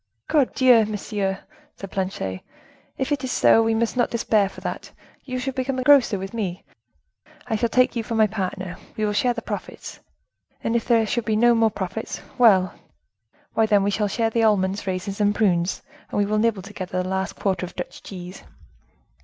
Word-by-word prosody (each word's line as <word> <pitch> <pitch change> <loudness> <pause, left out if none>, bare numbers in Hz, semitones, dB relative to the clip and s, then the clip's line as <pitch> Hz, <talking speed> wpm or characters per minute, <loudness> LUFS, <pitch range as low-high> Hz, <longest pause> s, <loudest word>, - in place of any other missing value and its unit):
"Cordieu! 255 -5 +4
monsieur!" 200 -2 -3 0.3
said 195 - -9
Planchet, 140 - -3 0.6
"If 265 +2 -2
it 285 -2 0
is 260 - -2
so, 225 - +5
we 225 0 +1
must 230 +2 0
not 245 - +2
despair 215 -4 +1
for - - -12
that; - - -5 0.3
you 255 -1 -4
shall 260 +1 -3
become 260 +1 -2
a 255 - -1
grocer 270 -7 +5
with 195 +2 -6
me; 195 -5 -3 0.8
I 220 - -1
shall 230 +2 0
take 255 +1 +3
you 235 - 0
for 230 +1 -4
my 220 -1 +5
partner, 190 -3 -4 0.2
we 215 - 0
will 210 - 0
share 245 +4 +2
the 230 - -5
profits, - - -7 0.6
and 230 - 0
if 235 - 0
there 230 -2 +3
should 235 +1 -2
be 215 -1 +1
no 240 +2 +5
more 225 -1 +3
profits, 195 +1 -5 0.2
well, 190 -7 +5 0.8
why 220 -1 +2
then 205 -2 +4
we 200 - +1
shall 210 +1 0
share 225 +2 0
the 230 - +1
almonds, 200 -2 +1
raisins 190 +2 -3
and 205 0 +2
prunes, 180 -4 +1 0.3
and - - -4
we 205 - +3
will 210 +1 0
nibble 215 -4 +1
together 185 -2 -4
the - - -5
last 190 0 -2
quarter 190 -3 -1
of 180 - -7
Dutch 180 - -7
cheese." 180 -1 -9
215 Hz, 195 wpm, -23 LUFS, 190-230 Hz, 0.8 s, so